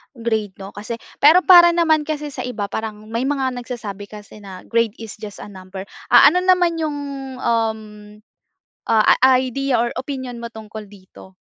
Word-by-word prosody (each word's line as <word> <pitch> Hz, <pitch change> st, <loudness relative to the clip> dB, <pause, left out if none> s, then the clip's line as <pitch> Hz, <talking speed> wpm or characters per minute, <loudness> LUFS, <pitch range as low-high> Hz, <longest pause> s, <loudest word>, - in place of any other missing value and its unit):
grade, 220 Hz, -4 st, -3 dB
'no 195 Hz, 0 st, -10 dB
kasi, 215 Hz, +3 st, -6 dB, 0.2 s
pero 320 Hz, +6 st, +6 dB
para 345 Hz, -2 st, +7 dB
naman 315 Hz, -3 st, +2 dB
kasi 300 Hz, -1 st, -4 dB
sa 255 Hz, -, -6 dB
iba, 205 Hz, -5 st, -5 dB
parang, 215 Hz, 0 st, -6 dB
may 235 Hz, +3 st, -1 dB
mga 270 Hz, -2 st, -1 dB
nagsasabi 215 Hz, -5 st, -7 dB
kasi 210 Hz, 0 st, -13 dB
na 190 Hz, -3 st, -11 dB
grade 230 Hz, -2 st, 0 dB
is 220 Hz, -1 st, -10 dB
just 210 Hz, -2 st, -9 dB
a 210 Hz, -, -11 dB
number, 190 Hz, 0 st, -9 dB, 0.2 s
ah, -, -, +7 dB
ano 360 Hz, -, +1 dB
naman 360 Hz, -2 st, +2 dB
'yong, 300 Hz, -2 st, -2 dB, 0.5 s
um, 225 Hz, -1 st, 0 dB, 1.1 s
ah, 220 Hz, -1 st, +3 dB, 0.3 s
idea 260 Hz, 0 st, -1 dB
or 235 Hz, +1 st, -1 dB
opinyon 260 Hz, -3 st, -6 dB
mo 235 Hz, -, -6 dB
tungkol 220 Hz, -2 st, -10 dB
dito? 190 Hz, -1 st, -16 dB
230 Hz, 165 wpm, -20 LUFS, 210-280 Hz, 1.1 s, para